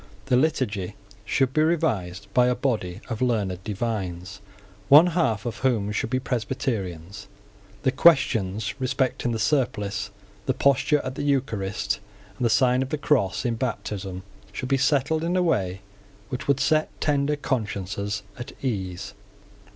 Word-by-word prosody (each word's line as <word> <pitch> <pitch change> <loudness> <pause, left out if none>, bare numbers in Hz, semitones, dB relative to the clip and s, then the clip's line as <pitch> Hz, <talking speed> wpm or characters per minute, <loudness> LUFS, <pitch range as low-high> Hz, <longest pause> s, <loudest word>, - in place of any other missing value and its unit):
The 130 -2 +2
Liturgy 115 - 0 0.3
should 130 +3 +1
be 155 - +3
revised 105 - 0
by 125 0 +5
a 125 - +2
body 110 -9 -2
of 115 -2 -4
learned 100 -7 0
divines, 100 -3 -4 0.5
one 150 +4 +9
half 165 -12 0
of 120 - -3
whom 115 -6 +1
should 105 - -1
be 130 +2 +1
Presbyterians. 100 -8 -3 0.6
The 130 - +3
questions 110 - +3
respecting 130 -1 0
the 115 - -1
surplice, 110 -5 0 0.4
the 130 - +1
posture 140 +2 +3
at 130 - -4
the 135 - -5
Eucharist, 125 -9 -1 0.4
and - - -5
the 120 - +3
sign 125 +3 +3
of 130 - -2
the 155 - -1
cross 130 -10 +1
in 120 - +1
baptism, 100 -6 -4 0.3
should 125 +4 -5
be 135 - +4
settled 140 +3 +2
in 175 +2 0
a 180 - +3
way 95 - 0 0.5
which 130 -2 -5
would 140 -1 +3
set 155 +3 +2
tender 145 0 +1
consciences 105 -6 -2 0.2
at 120 +3 -7
ease. 95 -5 -3
120 Hz, 150 wpm, -25 LUFS, 100-135 Hz, 0.6 s, one